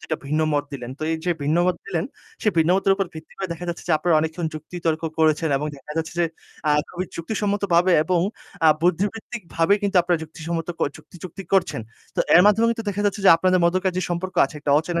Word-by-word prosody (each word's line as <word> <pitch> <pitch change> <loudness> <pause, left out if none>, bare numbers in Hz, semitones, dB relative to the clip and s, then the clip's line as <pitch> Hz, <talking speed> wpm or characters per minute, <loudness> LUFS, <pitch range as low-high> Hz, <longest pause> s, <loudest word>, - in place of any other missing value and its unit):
২ - - -13
টা - - +2
ভিন্ন 155 +2 0
মত 145 0 +1
দিলেন। 125 -3 -6
তো - - -7
এই 165 - 0
যে 180 - +1
ভিন্ন 150 +4 +1
মত 180 - +1
দিলেন, - - -1 0.4
সে 215 - +2
ভিন্ন 160 +2 +4
মতের 195 0 +3
উপর 195 -2 0
ভিত্তি 160 0 -11
করে 190 -2 -3
দেখা 170 +1 -7
যাচ্ছে 170 - -4
যে, 170 - +3
আপনারা 175 -2 +2
অনেকক্ষণ 160 +1 -2
যুক্তিতর্ক 160 +1 -3 0.2
করেছেন 160 0 +3
এবং 150 - -2
দেখা 150 +2 -10
যাচ্ছে 160 +1 -3
যে - - +4 0.4
আ - - +4 0.2
খুবই 180 +1 -3
যুক্তিসম্মতভাবে 195 -1 +1
এবং 175 0 +1 0.5
আ - - +8
বুদ্ধিবৃত্তিকভাবে 200 0 0
কিন্তু 200 -2 0
আপনারা 175 -1 +1
যুক্তিসম্মত 165 +1 -5
ক - - -22 0.2
যুক্তি - - -16
যুক্তিক 185 +1 -8
করছেন। 175 -10 +1 0.4
তো - - +2
এর 175 - +9
মাধ্যমে 220 +2 +4
কিন্তু 225 -1 -3
দেখা 205 0 -2
যাচ্ছে 205 +1 -1
যে - - +9
আপনাদের 185 +2 +2
মধ্যকার 185 +2 +1
যে - - 0
সম্পর্ক 185 +2 -3
আছে - - -7
একটা 145 - -1
অচেনা 170 +2 -2
175 Hz, 220 wpm, -23 LUFS, 160-190 Hz, 0.5 s, এর